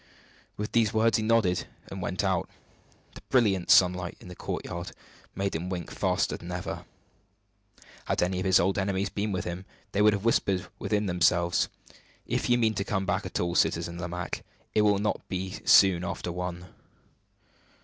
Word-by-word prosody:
With 105 Hz, +1 st, -4 dB
these 110 Hz, -2 st, +2 dB
words 110 Hz, 0 st, +4 dB
he 110 Hz, -, -1 dB
nodded 110 Hz, -6 st, +2 dB, 0.2 s
and -, -, -5 dB
went -, -, -2 dB
out. -, -, 0 dB, 0.6 s
The -, -, -11 dB
brilliant 100 Hz, -8 st, +2 dB
sunlight 90 Hz, -1 st, +4 dB
in -, -, -12 dB
the 90 Hz, -, -9 dB
courtyard 85 Hz, +1 st, -5 dB, 0.4 s
made 100 Hz, 0 st, -1 dB
him 85 Hz, +3 st, -3 dB
wink 90 Hz, -3 st, -4 dB
faster -, -, 0 dB
than -, -, -9 dB
ever. -, -, -5 dB, 1.2 s
Had -, -, +1 dB
any 90 Hz, +1 st, 0 dB
of 90 Hz, -, -3 dB
his 95 Hz, -2 st, +6 dB
old 95 Hz, +3 st, +1 dB
enemies 95 Hz, 0 st, 0 dB
been 105 Hz, +1 st, -2 dB
with 95 Hz, -, -2 dB
him, 90 Hz, +1 st, -5 dB, 0.3 s
they 100 Hz, -, +1 dB
would 105 Hz, 0 st, +6 dB
have 100 Hz, +1 st, -3 dB
whispered 100 Hz, -4 st, +2 dB
within 105 Hz, -1 st, 0 dB
themselves, 85 Hz, -1 st, +2 dB, 0.6 s
"If -, -, -1 dB
you 120 Hz, -, +5 dB
mean 110 Hz, -2 st, +2 dB
to 100 Hz, -, -1 dB
come 95 Hz, -1 st, -1 dB
back -, -, -1 dB
at -, -, -3 dB
all, 85 Hz, 0 st, 0 dB
Citizen 85 Hz, 0 st, +1 dB
Lomaque, 90 Hz, 0 st, -4 dB, 0.3 s
it 105 Hz, -, +4 dB
will 105 Hz, -1 st, +4 dB
not 105 Hz, +1 st, -1 dB
be 95 Hz, 0 st, -3 dB
soon 95 Hz, -3 st, +6 dB
after 90 Hz, 0 st, -4 dB
one!" 90 Hz, 0 st, -5 dB
95 Hz, 175 wpm, -28 LUFS, 90-105 Hz, 1.2 s, his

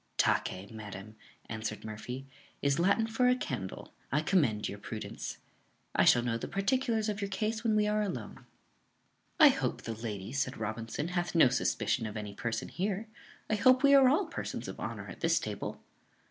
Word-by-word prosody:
"Tace, 95 Hz, +4 st, +1 dB
madam," 110 Hz, -1 st, -8 dB, 0.3 s
answered 110 Hz, -1 st, -4 dB
Murphy, 125 Hz, +5 st, -6 dB, 0.4 s
"is 140 Hz, +1 st, +2 dB
Latin 200 Hz, +5 st, +3 dB
for 225 Hz, +3 st, +2 dB
a 250 Hz, -, +5 dB
candle: 120 Hz, -, -5 dB, 0.2 s
I 145 Hz, +3 st, +2 dB
commend 140 Hz, -, +2 dB
your -, -, -6 dB
prudence. -, -, -6 dB, 0.6 s
I -, -, +4 dB
shall 120 Hz, -, +6 dB
know 115 Hz, -1 st, -1 dB
the -, -, -4 dB
particulars 225 Hz, +2 st, +1 dB
of 210 Hz, -1 st, -2 dB
your 200 Hz, -, -2 dB
case 215 Hz, +3 st, -2 dB
when 220 Hz, -2 st, +2 dB
we 210 Hz, 0 st, +3 dB
are 210 Hz, 0 st, +1 dB
alone." 130 Hz, -, -5 dB, 0.9 s
"I -, -, +10 dB
hope -, -, -1 dB
the 115 Hz, -, -3 dB
lady," 110 Hz, -2 st, -5 dB
said 135 Hz, -1 st, -1 dB
Robinson, 115 Hz, +8 st, -3 dB
"hath 175 Hz, -1 st, -2 dB
no 160 Hz, -6 st, +7 dB
suspicion 125 Hz, -2 st, 0 dB
of 105 Hz, 0 st, -6 dB
any 105 Hz, -1 st, -5 dB
person 115 Hz, +2 st, -3 dB
here. 200 Hz, +3 st, -2 dB, 0.4 s
I -, -, -1 dB
hope 255 Hz, +5 st, +5 dB
we 280 Hz, 0 st, +7 dB
are 270 Hz, -2 st, +8 dB
all 315 Hz, +9 st, +3 dB
persons 330 Hz, -, -5 dB
of -, -, -7 dB
honour -, -, -5 dB
at -, -, -9 dB
this -, -, +3 dB
table." -, -, -5 dB
145 Hz, 180 wpm, -31 LUFS, -, 0.9 s, I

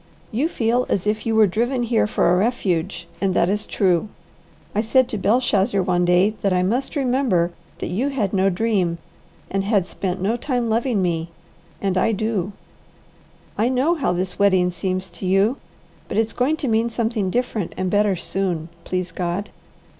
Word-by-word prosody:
You 260 Hz, +8 st, +1 dB
feel 240 Hz, -2 st, +1 dB
as 190 Hz, -, 0 dB
if 215 Hz, +1 st, -1 dB
you 225 Hz, -, +1 dB
were 220 Hz, -1 st, +6 dB
driven 240 Hz, +6 st, 0 dB
here 230 Hz, -2 st, +2 dB
for -, -, +1 dB
a 180 Hz, -, +4 dB
refuge, 185 Hz, -5 st, -1 dB
and 190 Hz, -2 st, +1 dB
that 170 Hz, -, +3 dB
is 210 Hz, +1 st, -1 dB
true. 185 Hz, 0 st, +1 dB, 0.6 s
I 210 Hz, -, +2 dB
said 245 Hz, +3 st, +3 dB
to 215 Hz, -, -3 dB
Belshazzar 205 Hz, -2 st, +2 dB
one 175 Hz, -1 st, +1 dB
day 180 Hz, +4 st, +4 dB
that 195 Hz, -, +1 dB
I 180 Hz, 0 st, +2 dB
must 245 Hz, +11 st, -1 dB
remember 250 Hz, -, +1 dB, 0.3 s
that -, -, -4 dB
you 240 Hz, +10 st, 0 dB
had 225 Hz, -9 st, -1 dB
no 195 Hz, 0 st, +3 dB
dream, 185 Hz, -3 st, 0 dB, 0.5 s
and 195 Hz, 0 st, 0 dB
had 200 Hz, -3 st, +2 dB
spent 185 Hz, 0 st, -3 dB
no 210 Hz, +6 st, 0 dB
time 245 Hz, -3 st, -1 dB
loving 230 Hz, -3 st, +1 dB
me, 165 Hz, -2 st, -1 dB, 0.5 s
and 190 Hz, -2 st, +1 dB
I 225 Hz, -, +2 dB
do 210 Hz, -2 st, -1 dB, 1.1 s
I 230 Hz, +3 st, +3 dB
know 260 Hz, +6 st, +2 dB
how 310 Hz, -6 st, 0 dB
this 180 Hz, +1 st, -2 dB
wedding 185 Hz, -3 st, +4 dB
seems 185 Hz, +2 st, -2 dB
to 175 Hz, +2 st, -6 dB
you, 195 Hz, +7 st, +3 dB, 0.5 s
but -, -, -4 dB
it's 225 Hz, 0 st, +1 dB
going 275 Hz, +6 st, +1 dB
to 290 Hz, -, -3 dB
mean 225 Hz, 0 st, +2 dB
something 225 Hz, -4 st, -1 dB
different 230 Hz, -4 st, -2 dB
and 185 Hz, -1 st, -1 dB
better 205 Hz, -1 st, +3 dB
soon, 175 Hz, -2 st, -2 dB, 0.2 s
please 185 Hz, -1 st, -2 dB
God. 180 Hz, +3 st, -3 dB
200 Hz, 180 wpm, -22 LUFS, 185-230 Hz, 1.1 s, were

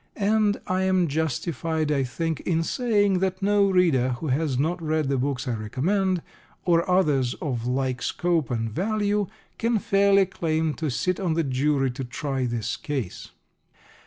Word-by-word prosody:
And 210 Hz, 0 st, +2 dB
I 185 Hz, 0 st, 0 dB
am 185 Hz, -2 st, +2 dB
justified, 160 Hz, +1 st, -1 dB
I 140 Hz, -2 st, +2 dB
think, 160 Hz, +5 st, -2 dB
in 165 Hz, -2 st, 0 dB
saying 205 Hz, -3 st, +1 dB
that 190 Hz, 0 st, -1 dB
no 200 Hz, 0 st, +3 dB
reader 155 Hz, -10 st, +3 dB
who 145 Hz, +5 st, -4 dB
has 140 Hz, 0 st, 0 dB
not 165 Hz, +6 st, 0 dB
read 155 Hz, -2 st, 0 dB
the 135 Hz, -, +1 dB
books 135 Hz, 0 st, -2 dB
I 125 Hz, -, 0 dB
recommend, 170 Hz, -, 0 dB, 0.4 s
or 170 Hz, 0 st, +2 dB
others 145 Hz, -9 st, +2 dB
of 125 Hz, -5 st, -3 dB
like 130 Hz, 0 st, -1 dB
scope 170 Hz, -6 st, 0 dB
and 115 Hz, -2 st, -1 dB
value, 205 Hz, -, 0 dB, 0.3 s
can 230 Hz, 0 st, +2 dB
fairly 200 Hz, -1 st, +4 dB
claim 160 Hz, -4 st, -1 dB
to 155 Hz, -1 st, -3 dB
sit 180 Hz, +8 st, -1 dB
on 175 Hz, -5 st, 0 dB
the 165 Hz, -, +1 dB
jury 135 Hz, 0 st, +1 dB
to 130 Hz, +2 st, -5 dB
try 130 Hz, +1 st, -2 dB
this 115 Hz, -1 st, -2 dB
case. 135 Hz, -11 st, -4 dB
160 Hz, 160 wpm, -25 LUFS, 135-190 Hz, 0.4 s, fairly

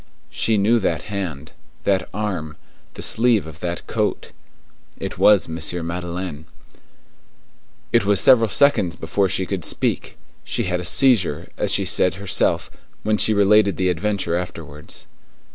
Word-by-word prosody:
She 110 Hz, -1 st, +1 dB
knew 110 Hz, +4 st, +3 dB
that 95 Hz, -, -1 dB
hand, 80 Hz, -7 st, -5 dB, 0.3 s
that 95 Hz, -2 st, 0 dB
arm, 90 Hz, -7 st, -4 dB, 0.4 s
the -, -, -6 dB
sleeve 115 Hz, -4 st, +2 dB
of 80 Hz, 0 st, -11 dB
that 85 Hz, 0 st, -4 dB
coat. -, -, -2 dB, 0.7 s
It -, -, -6 dB
was 105 Hz, -4 st, +5 dB
M. 80 Hz, +1 st, -6 dB, 0.3 s
Madeleine. 85 Hz, -2 st, -5 dB, 1.4 s
It -, -, +3 dB
was 100 Hz, 0 st, +3 dB
several 115 Hz, -4 st, +5 dB
seconds 140 Hz, -9 st, +3 dB
before 95 Hz, +4 st, -1 dB
she 95 Hz, 0 st, -1 dB
could 95 Hz, -3 st, -4 dB
speak; -, -, -2 dB, 0.3 s
she 120 Hz, -, -2 dB
had 90 Hz, -3 st, -1 dB
a 90 Hz, -, -6 dB
seizure, 100 Hz, -, +3 dB
as -, -, -1 dB
she -, -, +1 dB
said 90 Hz, -, +1 dB
herself, 95 Hz, -2 st, 0 dB, 0.3 s
when 105 Hz, 0 st, 0 dB
she -, -, +3 dB
related 100 Hz, 0 st, +4 dB
the 95 Hz, -1 st, +1 dB
adventure 95 Hz, 0 st, -1 dB
afterwards. 80 Hz, -5 st, -6 dB
95 Hz, 145 wpm, -21 LUFS, 85-105 Hz, 1.4 s, was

